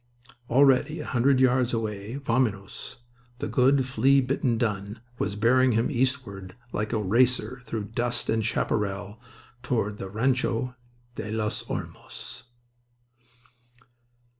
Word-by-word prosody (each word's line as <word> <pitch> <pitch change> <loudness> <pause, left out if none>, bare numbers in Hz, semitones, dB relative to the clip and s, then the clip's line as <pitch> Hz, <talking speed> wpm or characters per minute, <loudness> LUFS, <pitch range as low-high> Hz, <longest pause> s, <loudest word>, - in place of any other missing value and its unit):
Already 135 +4 +4
a 150 - -5
hundred 130 +2 +2
yards 125 -1 +3
away, 105 0 -4
Vaminos, 115 -5 -2 0.4
the - - -3
good 135 +1 +3
flea 130 +2 +4
bitten 130 -2 0
dun, 105 -2 -2 0.2
was 100 0 -1
bearing 125 +4 +4
him 115 +6 +1
eastward 120 -8 -2 0.2
like 105 0 -2
a - - +1
racer 125 +5 +1
through 110 -2 -3
dust 120 +3 -1
and 110 0 +1
chaparral 105 0 -2 0.4
towards 105 -5 -1
the 95 - -5
Rancho 125 +2 0 0.4
de 105 - -5
los 110 -1 -1
Olmos. 125 +1 -7
120 Hz, 115 wpm, -26 LUFS, 105-130 Hz, 0.4 s, Already